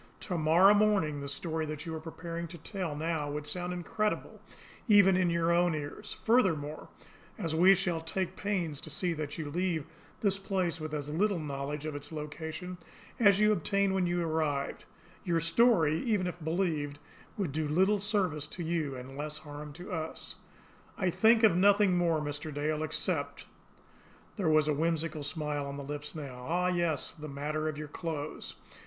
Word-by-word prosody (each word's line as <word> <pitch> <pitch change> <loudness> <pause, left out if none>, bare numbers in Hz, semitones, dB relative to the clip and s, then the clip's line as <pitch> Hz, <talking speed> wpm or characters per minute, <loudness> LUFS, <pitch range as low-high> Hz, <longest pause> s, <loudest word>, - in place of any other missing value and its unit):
To 185 - -3
morrow 170 +5 +6
morning 200 -9 +2
the 140 - -5
story 160 +2 -3
that 150 +1 -5
you 165 - -4
are 160 - -3
preparing 165 +1 -6
to 170 +1 -9
tell 175 -1 -4
now 155 -1 -1
would 145 0 -4
sound 180 +4 -1
incredible 195 +4 -2 0.5
even 200 -3 +7
in 180 -1 +3
your 170 0 +2
own 175 -1 +3
ears; 145 -1 -6
furthermore, 165 -11 +2 0.5
as 165 -7 -2
we 185 +4 +7
shall 175 -3 -1
take 185 +3 -2
pains 175 -8 -2
to - - -8
see 170 +3 -1
that 150 -2 -4
you 155 -3 -4
leave 175 -2 0 0.4
this 195 -2 +2
place 185 -4 -1
with 155 0 -3
as 150 0 -4
little 200 +3 +2
knowledge 145 -1 -4
of 155 -2 -3
its 145 +1 -7
location 160 +3 -6 0.4
as 200 -3 +6
you 210 0 +5
obtained 200 +1 +1
when 185 -2 +1
you 175 0 0
arrived, 155 -4 -1 0.4
your 170 -2 +1
story, 165 -2 +4
even 210 -6 +1
if 175 -2 -5
believed, 160 -4 -1 0.4
would 190 -8 -1
do 155 +1 -1
little 190 +7 +3
service 185 -8 0
to 175 - -6
you 160 -4 -1
and 130 +1 -8
less 150 +1 -4
harm 150 0 -8
to 180 +6 -9
us. 160 -2 -3 0.6
I 185 -3 +1
think 225 +4 +5
of 210 -6 +6
nothing 200 0 +5
more, 170 -3 +2
Mr. 145 +1 -4
Dale, 150 +1 -1
except 155 0 -2 0.4
" - - -28
There 185 -6 +1
was 155 -1 +4
a 150 - +3
whimsical 160 0 0
smile 145 -1 -2
on 140 0 -5
the 140 - -5
lips 145 +2 -6
now. 135 -5 -7
"Ah, 180 +2 +2
yes, 170 -5 0
the 155 -1 -9
matter 150 +3 -2
of 150 - -5
your 150 0 -5
clothes. 155 -1 -5
160 Hz, 180 wpm, -31 LUFS, 150-185 Hz, 0.6 s, even